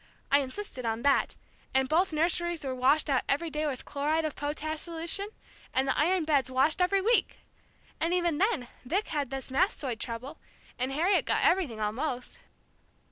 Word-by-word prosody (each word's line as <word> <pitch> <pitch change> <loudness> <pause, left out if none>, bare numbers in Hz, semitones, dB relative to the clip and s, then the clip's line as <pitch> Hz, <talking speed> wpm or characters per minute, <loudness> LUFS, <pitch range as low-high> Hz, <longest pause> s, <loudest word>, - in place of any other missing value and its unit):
I 280 - +6
insisted 270 0 -4
on 225 +1 -2
that, 280 -1 +2 0.4
and 265 0 +3
both 340 +6 +2
nurseries 335 0 +1
were 265 - -2
washed 265 +5 +3
out 270 -3 +2
every 320 +4 0
day 300 +1 -1
with 265 -4 -4
chloride 305 +3 0
of 305 - -3
potash 305 +2 -3
solution, 340 +4 -2 0.5
and 265 +1 +2
the - - +1
iron 345 +2 +2
beds 280 -4 +2
washed 270 +7 +2
every 385 +2 +3
week! 460 +4 +1 0.6
And 330 - 0
even 345 -4 +1
then 395 - +1 0.2
Vic 370 +12 -1
had 290 -5 -1
this 270 -1 -6
mastoid 270 - 0
trouble, 250 +6 -5 0.4
and 255 +2 0
Harriet 340 +8 +2
got - - +1
everything, 320 -12 +2
almost." 245 +5 -3
300 Hz, 170 wpm, -29 LUFS, 265-345 Hz, 0.6 s, I